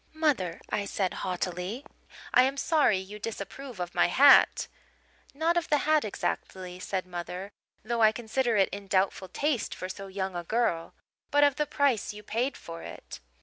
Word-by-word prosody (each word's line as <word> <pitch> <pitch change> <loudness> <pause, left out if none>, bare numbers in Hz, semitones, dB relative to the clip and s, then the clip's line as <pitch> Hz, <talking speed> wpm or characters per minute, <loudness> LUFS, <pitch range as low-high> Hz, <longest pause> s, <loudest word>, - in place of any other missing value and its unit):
"'Mother,' 265 - +1
I 200 - 0
said 195 -2 -1
haughtily, 180 +6 -3 0.5
'I 250 - +8
am 270 +2 +1
sorry 295 - +3
you 195 +3 -7
disapprove 225 +3 -7
of 175 -1 -4
my - - +4
hat 275 +10 +6 0.3
' - - -37 0.3
"'Not 330 +3 +1
of 340 - -1
the 295 - +4
hat 310 -1 +4
exactly,' 185 -3 -4
said 185 0 -3
mother, 180 +2 -6 0.3
'though 230 +2 -1
I 215 -1 +7
consider 235 +1 0
it 195 - +4
in 200 0 -7
doubtful 190 0 +1
taste 285 +2 -1
for 185 - -5
so 195 +1 -7
young 190 -1 -4
a 175 - -3
girl 170 -5 -1 0.3
but 290 0 +4
of 285 -2 +4
the 300 -1 0
price 275 -8 +1
you 210 - -10
paid 240 +6 -1
for 165 0 -9
it.' - - -9
210 Hz, 180 wpm, -28 LUFS, 185-275 Hz, 0.5 s, I